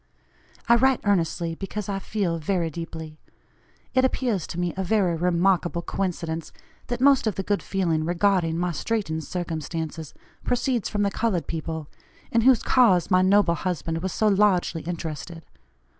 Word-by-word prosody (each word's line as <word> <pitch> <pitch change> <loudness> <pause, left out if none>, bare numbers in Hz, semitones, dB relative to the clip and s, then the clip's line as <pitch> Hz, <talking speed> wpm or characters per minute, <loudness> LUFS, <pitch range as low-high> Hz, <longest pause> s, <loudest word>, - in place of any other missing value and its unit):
I 235 0 +6
write 265 +1 +3
earnestly, 170 -4 0
because 195 +3 -5
I 195 -1 -2
feel 190 -4 -2
very 170 0 -1
deeply. 160 -1 -7 0.7
It 260 -1 +3
appears 245 -8 0
to 170 - -5
me 175 -1 -1
a 190 - -2
very 185 -3 +2
remarkable 175 0 +1
coincidence, 165 -4 -3 0.4
that 245 0 -3
most 275 -3 +5
of 215 - 0
the 195 - -3
good 205 +1 0
feeling 170 -5 0
regarding 175 -1 +1
my 175 0 0
straitened 160 -3 -2
circumstances 160 -2 -5 0.3
proceeds 245 -2 0
from 205 -1 0
the 200 - +1
colored 195 -10 -1
people, 160 -1 -4 0.4
in 230 - +3
whose 255 0 +5
cause 200 -9 +4
my 185 0 +5
noble 190 -1 +4
husband 165 -2 -2
was 190 0 -2
so 215 - +1
largely 195 -5 +2
interested. 165 0 -6
180 Hz, 155 wpm, -25 LUFS, 165-205 Hz, 0.7 s, I